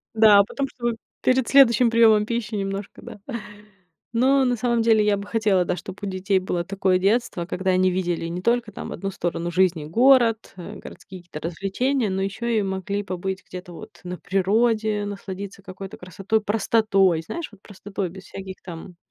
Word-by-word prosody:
Да, 215 -2 +7
а - - +7
потом, 275 +7 -3
чтобы 240 -2 -2 0.3
перед 255 -1 +2
следующим 250 -3 +6
приёмом 225 -2 +5
пищи 225 -1 -3
немножко, 195 0 -4
да. 230 -3 -10 0.9
Но 265 +3 +3
на 250 -1 +2
самом 235 0 +1
деле 220 -2 +4
я 205 -1 +2
бы 200 +1 -7
хотела, 205 -5 +2
да, - - -1
чтоб 185 +3 -9
у - - -1
детей 190 +1 0
было 180 -2 -2
такое 190 0 +1
детство, 195 -2 0
когда 190 +1 -1
они 185 0 +3
видели 175 -2 -1
не 175 +2 -4
только 235 +1 +1
там - - -7
1 195 0 -4
сторону 175 -2 -3
жизни, 175 -3 +2
город, 235 - +3
э, 175 - -8
городские 185 - -11
какие-то 165 -3 -9
развлечения, 210 +8 -1
но 190 0 -1
ещё 205 +5 -4
и 230 -2 +2
могли 195 +1 -3
побыть 190 0 -4
где-то 180 -1 -9
вот 215 +5 -12
на 180 0 -6
природе, 215 +3 +1
насладиться 200 -1 -7
какой-то 190 0 -9
красотой, 195 +4 -2
простотой, 205 -4 +2
знаешь, 315 - -6
вот 205 -2 -18
простотой, 195 -2 -5
без 190 +2 -11
всяких 190 -1 -8
там 175 0 -9
200 Hz, 180 wpm, -23 LUFS, 185-225 Hz, 0.9 s, Да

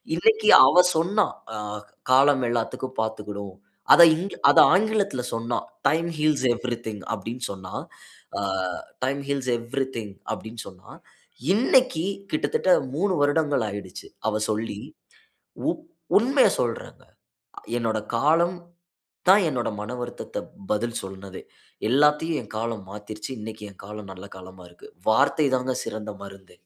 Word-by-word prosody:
இன்னைக்கு 445 0 +3 0.2
அவ 180 - +6
சொன்னா! 190 +6 +2 0.3
அ - - -4 0.5
காலம் 135 0 +5
எல்லாத்திக்கும் 120 +2 -3
பாத்துக்கிடும். 105 -3 -5 0.4
அத - - +9
இங்க 190 +4 -5
அத - - +6
ஆங்கிலத்தில 200 -8 +1
சொன்னா 115 +1 -2 0.3
"டைம் 165 +3 +1
ஹீல்ஸ் 150 -3 +1
எவ்ரிதிங்" 115 -4 -4
அப்படின்னு 115 +4 -6
சொன்னா. 95 -2 -8 0.7
அ. - - -2 0.6
"டைம் 140 +2 0
ஹீல்ஸ் 135 -2 -1
எவ்ரிதிங்" 115 -3 -4 0.2
அப்டின்னு 110 +1 -8
சொன்னா, 95 -1 -14 0.6
இன்னைக்கு 250 -6 +3 0.3
கிட்டத்தட்ட 170 +4 +1 0.2
3 190 +2 +1
வருடங்கள் 145 -4 +2
ஆயிடுச்சு. 100 -2 -8 0.2
அவ 110 - -1
சொல்லி. 110 -1 -2 0.9
உ - - +4 0.5
உண்மயை 265 +4 +4
சொல்றேங்க. 115 -2 -4 0.7
என்னோட 110 -1 0 0.2
காலம், 165 +8 +3 0.7
தான் 200 0 +7
என்னோட 125 -5 -1
மனவருத்தத்த 120 +2 -6 0.3
பதில் 115 +2 -1
சொன்னதே. 95 0 -9 0.5
எல்லாத்தையும் 150 +4 +3
என் 105 - -14
காலம் 115 -2 -3
மாத்திருச்சு. 105 +4 -8
இன்னைக்கு 110 0 -8
என் 95 - -16
காலம் 105 -2 -8
நல்ல 95 +1 -11
காலமா 95 0 -12
இருக்கு. 85 - -15 0.2
வார்த்தை 140 +6 +3
தாங்க 125 0 -2
சிறந்த 105 -1 -5
மருந்தே! 95 -1 -12
120 Hz, 120 wpm, -25 LUFS, 105-155 Hz, 0.9 s, அத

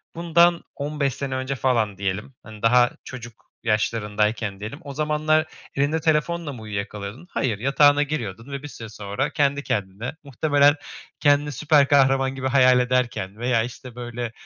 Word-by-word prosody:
bundan 170 0 +3
15 140 -2 -1
sene 135 -2 -4
önce 130 +1 -2
falan 115 -7 0
diyelim, 100 +6 -3
hani, 110 -1 -12
daha 120 +1 +5
çocuk 120 -3 -10 0.2
yaşlarındayken 105 -1 0
diyelim, 110 +9 -7
o 140 -1 -7
zamanlar 155 +1 +1 0.3
elinde 145 +3 +1
telefonla 160 -1 0
mı 115 - -10
uyuyakalıyordun? 105 - -6
Hayır, 110 -6 -1
yatağına 145 +3 +4
giriyordun 120 -4 -5
ve 140 +1 -5
bir - - -5
süre 115 -5 -9
sonra 105 +6 -3
kendi 140 0 +1
kendine 105 +7 -3
muhtemelen 145 +1 +3 0.4
kendini 145 0 +3
süper 145 +1 +3
kahraman 135 -1 +3
gibi 130 0 -2
hayal 130 -2 +5
ederken 125 -6 -1
veya, 120 -1 +1
işte, 125 0 -9
böyle, 120 -1 -5
130 Hz, 150 wpm, -23 LUFS, 110-145 Hz, 0.4 s, daha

